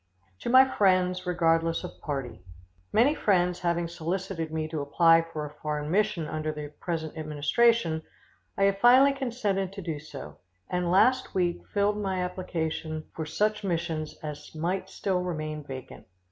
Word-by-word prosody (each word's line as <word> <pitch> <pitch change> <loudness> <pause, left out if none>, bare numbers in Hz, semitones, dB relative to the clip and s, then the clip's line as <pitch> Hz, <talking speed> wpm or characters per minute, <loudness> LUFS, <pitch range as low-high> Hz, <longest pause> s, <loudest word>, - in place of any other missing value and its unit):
To - - -4
my 260 +2 +8
friends, 185 -4 +2
regardless 165 -1 +2
of - - -9
party. 135 - -4 0.5
Many 250 +7 +4
friends 180 - +2
having 170 -1 0
solicited 170 0 -3
me 160 -1 -2
to 155 -2 -3
apply 165 +3 +5
for 165 -2 -6
a 150 - -9
foreign 150 0 -2
mission 200 -5 +1
under 155 0 -2
the 150 -1 -6
present 160 -3 -3
administration, 160 +4 +2 0.6
I 195 - +2
have 195 0 +3
finally 255 +5 +7
consented 225 -8 -1
to 195 - -7
do 160 -3 -3
so, 150 -2 -10 0.3
and 180 -1 0
last 255 +8 +3
week 175 -2 +1
filed 205 0 +1
my 190 -2 -1
application 160 -3 -4
for 160 -1 -5
such 210 +6 0
missions 165 -4 -2
as 150 +1 -7
might 185 +4 -2
still 190 -2 -1
remain 155 -4 -4
vacant. 130 -7 -9
170 Hz, 155 wpm, -28 LUFS, 155-195 Hz, 0.6 s, my